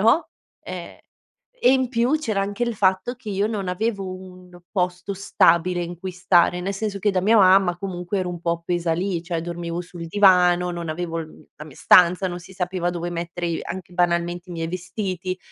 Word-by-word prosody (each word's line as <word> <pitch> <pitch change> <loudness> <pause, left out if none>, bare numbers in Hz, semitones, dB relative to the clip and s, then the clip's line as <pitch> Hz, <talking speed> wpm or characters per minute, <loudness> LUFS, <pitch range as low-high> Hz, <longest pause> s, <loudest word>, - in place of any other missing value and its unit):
no, 230 - +3 0.3
e - - -8 0.7
e 250 - +8
in 260 -1 +2
più 245 +5 +1
c'era 215 -9 -1
anche 205 +4 -1
il 235 -1 -2
fatto 190 +5 +1
che 240 -3 -12
io 200 +2 0
non 205 -4 -3
avevo 200 +1 -1
un 180 -1 -12
posto 180 +1 -1
stabile 175 -2 +2
in 175 0 -5
cui 185 +2 -6
stare. 180 0 +3
Ne 195 +2 -2
senso 200 0 -3
che 205 +1 +1
da 185 - +1
mia 220 +4 +4
mamma 185 -2 +5
comunque 185 0 -3
ero 180 -1 -2
un 175 -1 -7
po' 170 0 -1
pesa 175 -2 0
lì: 180 0 -2
cioè, 170 -1 -3
dormivo 170 0 -4
sul 175 -1 -8
divano, 180 -2 +4
non 170 -1 -5
avevo 165 +1 -3
il, 160 - -7
mhmm - - -17
la 150 - -9
mia 145 - -14
stanza, 180 +1 +5
non 175 0 -6
si 185 +2 -14
sapeva 180 -1 -2
dove 175 0 -4
mettere 170 0 -4
i 165 -1 -2
anche 180 -1 -7
banalmente 175 0 0
i - - -5
miei 165 -1 -3
vestiti, 185 0 -4
180 Hz, 205 wpm, -23 LUFS, 175-195 Hz, 0.7 s, e